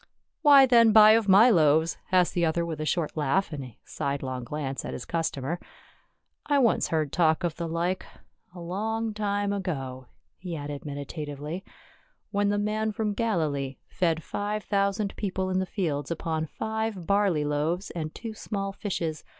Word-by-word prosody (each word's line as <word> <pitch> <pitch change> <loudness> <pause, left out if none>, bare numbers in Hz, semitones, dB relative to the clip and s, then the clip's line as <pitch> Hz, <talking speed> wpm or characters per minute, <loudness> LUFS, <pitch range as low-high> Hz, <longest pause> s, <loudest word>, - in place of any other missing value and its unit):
"Why 285 -3 +8
then 235 -3 +6
buy 215 0 +9
of 220 -2 +3
my 215 +6 +7
loaves?" 160 -2 +3
asked 180 -1 +3
the 175 - 0
other 170 +1 +1
with 160 -2 -4
a 155 - -2
short 170 -3 -1
laugh 155 +4 0
and 140 -2 -4
a 125 -4 -12
sidelong 135 -3 -3
glance 135 0 -4
at - - -5
his - - -6
cus 165 -1 0
tomer. 145 +6 -4 0.4
" - - -48
I 290 -1 +3
once 245 -5 +3
heard 155 -3 -1
talk 160 -1 +2
of 170 -2 -2
the 170 - -3
like 170 +3 -1 0.3
— 175 - -32
a - - -8
long 215 +6 -2
time 205 -1 -1
ago," 135 -10 -4 0.3
he 180 -3 -5
added 145 -1 -6
meditatively, 145 +3 -5 0.3
" - - -39
when 205 0 +1
the 205 - +1
man 215 +1 0
from 210 0 -2
Galilee 155 - -1
fed 165 -3 0
five 210 +1 -3
thousand 200 0 0
people 190 -2 -2
in 185 - +1
the 190 - -2
fields 150 -8 -2
upon 160 -1 -2
five 220 -2 -3
barley 200 -6 +2
loaves 155 +6 -1
and 155 -2 -5
two 225 -2 -6
small 195 -2 -4
fishes. 165 -7 -3
175 Hz, 180 wpm, -27 LUFS, 155-205 Hz, 0.4 s, buy